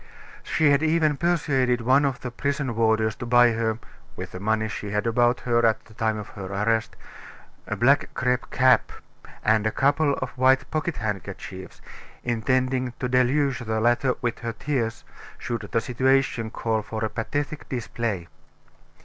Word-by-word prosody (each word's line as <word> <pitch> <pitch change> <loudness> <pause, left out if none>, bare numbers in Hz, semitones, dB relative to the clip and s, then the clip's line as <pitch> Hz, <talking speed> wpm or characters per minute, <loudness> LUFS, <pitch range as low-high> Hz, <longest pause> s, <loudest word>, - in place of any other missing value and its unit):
She 155 -2 +2
had 140 +1 +3
even 155 -1 +2
persuaded 135 -7 +1
one 130 +5 +4
of 135 -3 -2
the 125 - -5
prison 140 -1 -2
warders 110 -1 +2
to 120 - -6
buy 120 0 +6
her 110 -1 -1 0.4
with - - -7
the 90 - -7
money 110 +2 0
she 105 -1 -5
had 105 +2 -1
about 120 +1 +2
her 120 -1 +1
at 110 -1 +2
the 110 - -17
time 110 0 -1
of 105 - -7
her 95 -2 -8
arrest 110 +3 0 0.7
a 110 - -2
black 125 +7 +3
crape 125 0 0
cap, 130 0 +3 0.5
and 110 0 +3
a - - 0
couple 140 +2 +2
of - - -4
white 130 0 +3
pocket 155 0 -2
handkerchiefs, 95 -2 -6 0.4
intending 125 +2 0
to 125 - -1
deluge 130 +2 +2
the 110 -2 -2
latter 120 +3 +2
with 120 -1 -1
her 115 -1 -4
tears, 120 -6 -2 0.3
should 120 -1 -5
the 115 - +2
situation 125 0 +1
call 110 -1 -1
for 110 +1 -4
a - - +1
pathetic 145 +7 -4
display. 115 -7 -3
120 Hz, 165 wpm, -25 LUFS, 110-130 Hz, 0.7 s, buy